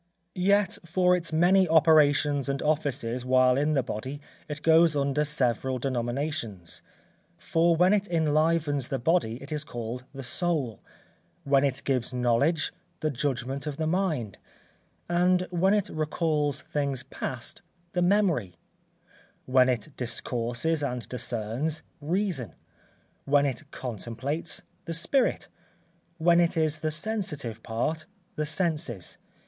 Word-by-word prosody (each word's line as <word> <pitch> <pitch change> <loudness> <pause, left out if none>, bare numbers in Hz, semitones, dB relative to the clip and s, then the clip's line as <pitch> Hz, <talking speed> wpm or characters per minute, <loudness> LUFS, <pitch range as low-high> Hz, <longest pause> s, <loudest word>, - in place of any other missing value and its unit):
Yet 200 +1 +2
for 180 +2 +3
its 170 -2 -2
many 180 +3 +4
operations 145 -3 +4
and 140 0 -1
offices 135 -6 -1
while 130 0 +4
in 150 +3 +1
the 135 -3 +2
body 130 +7 -5 0.3
it 150 +1 -6
goes 165 -1 +5
under 140 +1 +1
several 130 -3 0
denominations: 120 - -3 0.6
for 165 +1 +2
when 180 +4 +4
it 205 -1 +1
enlivens 155 -4 +1
the 135 - -2
body 130 -3 +1
it 140 - -10
is 150 -1 -2
called 120 -2 -6
the 135 -1 -8
soul; 140 - -1 0.6
when 140 -1 +3
it 140 -1 0
gives 130 -2 -1
knowledge, 125 +7 +1 0.3
the 155 - 0
judgment 135 +1 -2
of 145 -2 -4
the 160 - -1
mind; 155 - -1 0.7
and 180 +1 +2
when 180 +2 +2
it 205 -1 0
recalls 155 -1 -1
things 140 -3 -2
past, 130 -2 -5 0.3
the 180 - +1
memory; 175 - +2 0.9
when 130 0 +4
it 125 +3 -1
discourses 120 +5 -1
and 125 -4 -3
discerns, 125 +5 -2 0.2
reason; 160 - -1 0.7
when 145 0 +4
it 140 +2 -3
contemplates, 130 - -4 0.2
the 165 - -2
spirit; 240 +11 +1 0.7
when 170 +1 +4
it 170 -1 +2
is 155 -1 +1
the 155 - -1
sensitive 155 - -3
part, 120 +9 -2 0.3
the 150 0 -1
senses. 155 - -2
145 Hz, 130 wpm, -27 LUFS, 125-165 Hz, 0.9 s, goes